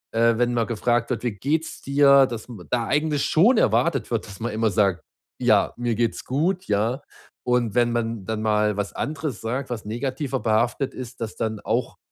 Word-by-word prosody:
äh, 115 0 +3
wenn 120 0 +2
man 115 -1 +1
gefragt 120 +1 0
wird: 120 - -1
‚Wie 120 - 0
geht's 150 +10 -2
dir?‘, 140 -1 +5
dass 120 -4 -6 0.2
da 120 -2 0
eigentlich 150 -1 +1
schon 215 +10 +4
erwartet 140 -9 +1
wird, 115 -2 -1
dass 100 -2 -11
man 120 +1 -3
immer 110 0 0
sagt: 95 -2 +1 0.4
‚Ja, - - +3
mir 120 -1 -1
geht's 115 0 -1
gut.‘,“ 175 +8 0
ja. 110 +5 0 0.4
Und 125 -4 +1
wenn 120 -1 +3
man 115 -3 -2
dann 110 +1 -3
mal 105 -1 +1
was 100 -2 -3
anderes 150 -5 -4
sagt, 125 +4 -3
was 115 -4 -5
negativer 130 +4 -3
behaftet 120 +5 0
ist, 125 -1 -8
dass 110 - -4
dann 110 -2 -3
auch - - -2
120 Hz, 190 wpm, -24 LUFS, 110-135 Hz, 0.4 s, dir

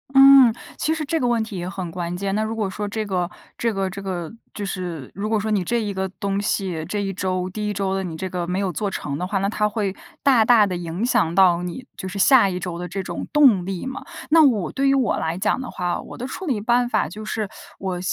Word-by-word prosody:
嗯， 270 -2 +9 0.3
其 315 - +1
实 320 -1 -3
这 325 +3 0
个 250 - +1
问 235 -2 +2
题 220 -2 -7
也 175 0 -4
很 185 -3 -5
关 175 0 -4
键。 195 +1 -2
那 210 - +1
如 220 +1 -3
果 215 -3 -1
说 205 +2 -4
这 215 +1 -3
个 180 -3 -1 0.3
这 230 - 0
个 195 -1 -1
这 200 +2 -7
个 180 -4 -4 0.2
就 205 - -3
是 175 -8 -5
如 205 +3 -3
果 220 -1 +2
说 215 +1 -2
你 200 -3 +2
这 235 +6 0
一 205 -2 -3
个 190 0 -2
东 200 +1 -2
西， 190 -5 -1
这 205 - -1
一 195 -1 -2
周 185 -1 -1
第 210 +2 -3
1 - - -1
周 195 -1 -1
的 195 0 -1
你 165 -3 -5
这 190 - -3
个 180 -2 -3
没 180 +1 -1
有 195 -2 0
做 205 +5 -1
成 145 -7 -4
的 180 - -2
话， 195 +1 -1
那 195 +1 +1
它 210 0 +1
会 205 -3 -2 0.3
大 260 -5 +5
大 220 -2 +6
地 185 -2 -2
影 175 +4 -3
响 170 -9 +2
到 180 -3 +5
你 180 +9 -6
就 190 - -6
是 190 +2 -6
下 235 0 +6
一 180 -1 -3
周 175 -2 -5
的 180 - -4
这 190 +3 -4
种 - - -5
动 255 -12 +5
力 190 +1 -4
嘛。 265 +1 -5 0.3
那 325 0 +7
我 225 - +2
对 275 0 +1
于 275 - +4
我 255 -6 +2
来 160 +1 -2
讲 195 - 0
的 255 - -6
话， 175 -1 -2
我 - - -10
的 245 - -4
处 350 +8 -6
理 250 -7 0
办 240 +3 +2
法 - - +1
就 205 +7 -8
是， 215 -1 -2 0.3
我 185 -2 -3
195 Hz, 285 characters per minute, -22 LUFS, 180-225 Hz, 0.3 s, 嗯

